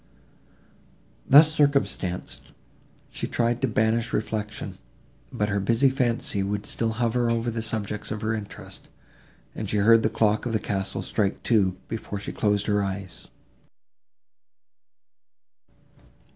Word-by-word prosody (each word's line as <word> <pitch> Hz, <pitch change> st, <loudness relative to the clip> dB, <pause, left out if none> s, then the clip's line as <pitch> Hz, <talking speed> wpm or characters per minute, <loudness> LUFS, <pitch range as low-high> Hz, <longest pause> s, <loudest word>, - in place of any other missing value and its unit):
Thus 150 Hz, +3 st, +8 dB
circumstanced, 140 Hz, -, 0 dB, 0.6 s
she -, -, -4 dB
tried 120 Hz, 0 st, 0 dB
to 135 Hz, -, +2 dB
banish 115 Hz, +1 st, +1 dB
reflection, 105 Hz, -1 st, -3 dB, 0.5 s
but 105 Hz, 0 st, -1 dB
her 100 Hz, 0 st, 0 dB
busy 115 Hz, +7 st, +3 dB
fancy 120 Hz, -6 st, 0 dB
would 100 Hz, +1 st, -2 dB
still 115 Hz, -1 st, 0 dB
hover 120 Hz, +1 st, +1 dB
over 115 Hz, 0 st, 0 dB
the 115 Hz, 0 st, -3 dB
subjects 110 Hz, -2 st, -3 dB
of 105 Hz, -1 st, -4 dB
her 110 Hz, +1 st, 0 dB
interest, 105 Hz, -2 st, -7 dB, 0.6 s
and -, -, -5 dB
she 105 Hz, -, 0 dB
heard 115 Hz, +3 st, +6 dB
the 110 Hz, -, +1 dB
clock 110 Hz, +1 st, +1 dB
of 115 Hz, -, -3 dB
the 110 Hz, -, +2 dB
castle 95 Hz, -1 st, -3 dB
strike 100 Hz, -2 st, -1 dB
two, 95 Hz, -6 st, +2 dB
before 110 Hz, -2 st, -5 dB
she 100 Hz, -, -5 dB
closed 105 Hz, -1 st, +1 dB
her 105 Hz, -1 st, +1 dB
eyes. 95 Hz, -1 st, -6 dB
110 Hz, 130 wpm, -25 LUFS, 100-115 Hz, 0.6 s, Thus